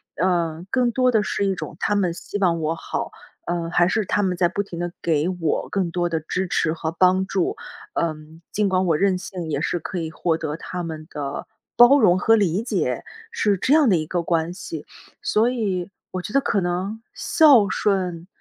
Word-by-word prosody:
呃， 170 Hz, -1 st, 0 dB
更 250 Hz, -2 st, +2 dB
多 255 Hz, -1 st, +3 dB
的 220 Hz, -2 st, +3 dB
是 200 Hz, -, -1 dB
一 195 Hz, -1 st, +1 dB
种 -, -, -7 dB
他 210 Hz, -, +1 dB
们 180 Hz, -4 st, +1 dB
希 205 Hz, +3 st, -6 dB
望 170 Hz, -4 st, +2 dB
我 160 Hz, +2 st, 0 dB
好， -, -, -4 dB, 0.3 s
呃， 170 Hz, -1 st, -2 dB
还 175 Hz, 0 st, +4 dB
是 215 Hz, +1 st, 0 dB
他 205 Hz, -, +1 dB
们 185 Hz, -1 st, 0 dB
在 175 Hz, -1 st, +3 dB
不 200 Hz, +3 st, -2 dB
停 175 Hz, -4 st, -8 dB
地 175 Hz, 0 st, -2 dB
给 160 Hz, -1 st, +1 dB
我 165 Hz, -, -1 dB
更 185 Hz, -4 st, -1 dB
多 175 Hz, -1 st, 0 dB
的 165 Hz, -1 st, -1 dB
支 180 Hz, +4 st, -2 dB
持 160 Hz, -2 st, +1 dB
和 160 Hz, -1 st, -3 dB
帮 185 Hz, +2 st, +3 dB
助。 190 Hz, -3 st, -1 dB, 0.4 s
嗯， 155 Hz, 0 st, -3 dB
尽 210 Hz, -1 st, +1 dB
管 185 Hz, 0 st, +1 dB
我 160 Hz, -2 st, +3 dB
任 190 Hz, 0 st, +2 dB
性 180 Hz, -4 st, -6 dB
也 140 Hz, 0 st, -1 dB
是 175 Hz, -, 0 dB
可 180 Hz, +3 st, -5 dB
以 160 Hz, -1 st, -3 dB
获 165 Hz, 0 st, 0 dB
得 155 Hz, -2 st, -3 dB
他 180 Hz, +1 st, -5 dB
们 160 Hz, -1 st, -6 dB
的， 145 Hz, -1 st, -5 dB, 0.3 s
包 260 Hz, +4 st, +8 dB
容 185 Hz, -5 st, +5 dB
和 225 Hz, +4 st, +5 dB
理 195 Hz, -1 st, +1 dB
解， 170 Hz, -, -1 dB, 0.3 s
是 205 Hz, -3 st, +1 dB
这 265 Hz, +9 st, +2 dB
样 300 Hz, -6 st, +5 dB
的 185 Hz, -, +5 dB
一 155 Hz, -, -2 dB
个 175 Hz, +1 st, -1 dB
关 165 Hz, 0 st, 0 dB
系。 160 Hz, -5 st, -7 dB, 0.4 s
所 225 Hz, +3 st, +2 dB
以， 200 Hz, -7 st, -2 dB, 0.2 s
我 185 Hz, -, -3 dB
觉 210 Hz, -, -7 dB
得 275 Hz, -, +5 dB
可 200 Hz, -6 st, 0 dB
能 185 Hz, +5 st, -2 dB
孝 275 Hz, -, +5 dB
顺 185 Hz, -5 st, -1 dB
180 Hz, 225 characters per minute, -23 LUFS, 165-200 Hz, 0.4 s, 包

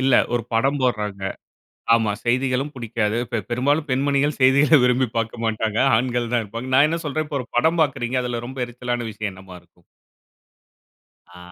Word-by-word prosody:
இல்ல 130 Hz, -1 st, +3 dB, 0.2 s
ஒரு 120 Hz, -, 0 dB
படம் 135 Hz, +5 st, +1 dB
போடுறாங்க. 105 Hz, -6 st, -1 dB, 0.7 s
ஆமா 110 Hz, -3 st, +1 dB
செய்திகளும் 130 Hz, +3 st, 0 dB
புடிக்காது. 115 Hz, -3 st, -2 dB
பெ 115 Hz, -, +1 dB
பெரும்பாலும் 145 Hz, +6 st, 0 dB
பெண்மணிகள் 140 Hz, +2 st, +1 dB
செய்திகள 140 Hz, +4 st, +5 dB
விரும்பி 125 Hz, +1 st, +3 dB
பாக்க 115 Hz, +1 st, -2 dB
மாட்டாங்க. 110 Hz, -1 st, -1 dB, 0.2 s
ஆண்கள் 120 Hz, 0 st, -1 dB
தான் 120 Hz, -2 st, +2 dB
வெப்பாங்க. 115 Hz, +5 st, -6 dB
நான் 140 Hz, +3 st, +6 dB
என்ன 165 Hz, +2 st, -1 dB
சொல்ற 155 Hz, +1 st, -2 dB
இப்போ 145 Hz, -1 st, -3 dB
ஒரு 125 Hz, -, -7 dB
படம் 165 Hz, +6 st, +3 dB
பாக்குறீங்க 130 Hz, -3 st, -1 dB
அதுல 120 Hz, -1 st, -3 dB
ரொம்ப 130 Hz, 0 st, -4 dB
எரிச்சலான 120 Hz, -1 st, -4 dB
விஷயம் 105 Hz, 0 st, -4 dB
என்னவா 95 Hz, -1 st, -12 dB
இருக்கும்? -, -, -30 dB, 1.5 s
ஆ. 90 Hz, -, -13 dB
125 Hz, 160 wpm, -22 LUFS, 115-135 Hz, 1.5 s, நான்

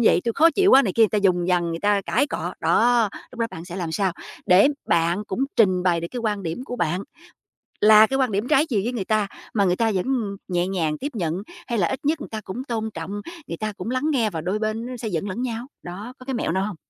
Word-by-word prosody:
vậy, -, -, +5 dB
tui 235 Hz, -, 0 dB
khó 320 Hz, +7 st, +5 dB
chịu 390 Hz, +4 st, +3 dB
quá" 270 Hz, -, +8 dB
này 195 Hz, -, -1 dB
kia, 230 Hz, -, +3 dB
người 220 Hz, -, +6 dB
ta 210 Hz, -, 0 dB
vùng 180 Hz, -2 st, +3 dB
vằng, 175 Hz, -2 st, +1 dB
người 165 Hz, -, -3 dB
ta 205 Hz, -1 st, +3 dB
cãi 240 Hz, +11 st, +2 dB
cọ. -, -, -4 dB
Đó, 235 Hz, -1 st, +3 dB, 0.2 s
lúc 250 Hz, -, -12 dB
đó 230 Hz, -, +2 dB
bạn 165 Hz, -, -8 dB
sẽ 175 Hz, 0 st, -8 dB
làm 170 Hz, -4 st, -3 dB
sao, 190 Hz, +1 st, 0 dB, 0.3 s
để 185 Hz, +9 st, +6 dB, 0.2 s
bạn 170 Hz, +4 st, +2 dB
cũng 215 Hz, +7 st, -1 dB
trình 185 Hz, -5 st, +4 dB
bày 175 Hz, -2 st, +2 dB
được 170 Hz, -, -4 dB
cái 245 Hz, -, -4 dB
quan 210 Hz, -3 st, -1 dB
điểm 175 Hz, +9 st, -4 dB
của 245 Hz, -, -6 dB
bạn 175 Hz, -1 st, -1 dB, 0.8 s
là 215 Hz, +1 st, +8 dB
cái 270 Hz, -, -1 dB
quan 260 Hz, -4 st, +1 dB
điểm 205 Hz, +5 st, -1 dB
trái 300 Hz, +1 st, +4 dB
chiều 215 Hz, -8 st, 0 dB
với 240 Hz, +3 st, -2 dB
người 200 Hz, -6 st, -3 dB
ta, 215 Hz, -2 st, +1 dB, 0.3 s
mà 200 Hz, -3 st, +2 dB
người 180 Hz, -1 st, +2 dB
ta 225 Hz, +2 st, +1 dB
vẫn 185 Hz, -, 0 dB, 0.4 s
nhẹ 175 Hz, -1 st, 0 dB
nhàng 165 Hz, -5 st, -1 dB
tiếp 280 Hz, -, -3 dB
nhận? 170 Hz, -7 st, -1 dB, 0.3 s
Hay 235 Hz, -, -1 dB
là 175 Hz, -, +3 dB
ít 265 Hz, +1 st, -5 dB
nhất 310 Hz, +1 st, +1 dB
người -, -, -7 dB
ta 220 Hz, -, -4 dB
cũng 235 Hz, +7 st, -5 dB
tôn 225 Hz, -4 st, -3 dB
trọng, 165 Hz, +4 st, -6 dB, 0.4 s
người 165 Hz, -, -5 dB
ta 215 Hz, +2 st, -3 dB
cũng 185 Hz, -, -5 dB
lắng 255 Hz, +1 st, -1 dB
nghe 235 Hz, -6 st, +2 dB
và 165 Hz, -5 st, -4 dB
đôi 185 Hz, +6 st, -1 dB
bên 215 Hz, +1 st, -2 dB
nó 250 Hz, 0 st, -6 dB
sẽ 230 Hz, -1 st, -5 dB
dẫn 180 Hz, -1 st, -2 dB
lẫn 210 Hz, +6 st, -4 dB
nhau? 240 Hz, -1 st, -3 dB, 0.2 s
Đó, 200 Hz, +8 st, -7 dB
có 255 Hz, -, -12 dB
cái 265 Hz, -, -3 dB
mẹo 235 Hz, -, -1 dB
nào 190 Hz, +3 st, 0 dB
hông? 210 Hz, -2 st, -5 dB
210 Hz, 275 wpm, -23 LUFS, 180-240 Hz, 0.8 s, quá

